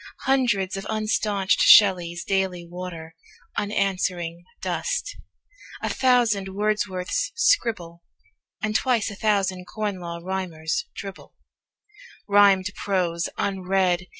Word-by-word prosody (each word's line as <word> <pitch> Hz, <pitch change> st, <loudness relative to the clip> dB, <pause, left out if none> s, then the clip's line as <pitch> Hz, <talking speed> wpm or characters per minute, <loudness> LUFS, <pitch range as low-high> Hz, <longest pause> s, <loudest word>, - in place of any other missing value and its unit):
Hundreds 230 Hz, -8 st, +1 dB
of 195 Hz, -, -5 dB
unstaunched 210 Hz, -2 st, 0 dB
Shelleys 175 Hz, -4 st, +6 dB
daily 190 Hz, -3 st, -1 dB
water 170 Hz, -2 st, -8 dB, 0.4 s
Unanswering 185 Hz, -4 st, -1 dB
dust; -, -, -2 dB, 0.7 s
a -, -, 0 dB
thousand 240 Hz, -7 st, +2 dB
Wordsworths 205 Hz, -, -1 dB
scribble; 220 Hz, -, +1 dB, 0.6 s
And 215 Hz, 0 st, -1 dB
twice 235 Hz, -4 st, +1 dB
a -, -, -8 dB
thousand 195 Hz, -3 st, 0 dB
Corn 205 Hz, -1 st, -4 dB
Law 170 Hz, -1 st, -6 dB
Rhymers 180 Hz, -, -3 dB
dribble -, -, -9 dB, 0.9 s
Rhymed 200 Hz, -2 st, +5 dB
prose, 175 Hz, -4 st, -1 dB
unread. 185 Hz, -2 st, 0 dB
195 Hz, 95 wpm, -24 LUFS, 180-210 Hz, 0.9 s, Shelleys